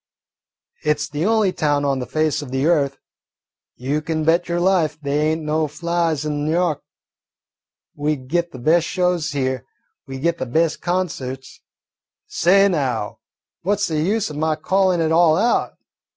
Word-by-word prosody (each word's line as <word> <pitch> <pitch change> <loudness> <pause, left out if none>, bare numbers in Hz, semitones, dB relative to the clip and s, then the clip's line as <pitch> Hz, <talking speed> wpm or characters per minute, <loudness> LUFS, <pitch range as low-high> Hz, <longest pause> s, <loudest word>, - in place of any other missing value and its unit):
It 150 0 +1
's - - -2
the 150 +5 -1
only 215 -4 +2
town 145 -1 0
on 135 -1 0
the 125 - -5
face 155 -1 0
of 145 - -8
the 135 +2 -1
earth. 145 -5 +2 0.8
You 140 +4 -2
kin 155 0 -2
bet 170 +2 +2
your 170 0 0
life 175 -5 +1
they 145 0 -1
ain't 160 0 -1
no 155 +1 0
flies 165 -1 -1
on 150 0 -2
N' - - +1
Yawk. 170 -3 +1 1.1
We 150 +1 0
git 170 +6 -2
the - - -9
best 165 +7 +2
shows 180 -4 0
here, 130 -2 -1 0.4
we 135 0 -6
git 170 +5 -1
the 130 - -3
best 160 +6 0
concerts 145 -8 -3 0.6
say, 195 +4 +4
now, 130 - -2 0.4
what 200 +3 0
's 205 - 0
the 155 -1 0
use 200 +1 0
o' - - -7
my 155 +1 0
callin' 185 +2 +1
it 160 0 +1
all 165 -1 +5
out? 235 +5 +1
155 Hz, 170 wpm, -21 LUFS, 145-175 Hz, 1.1 s, all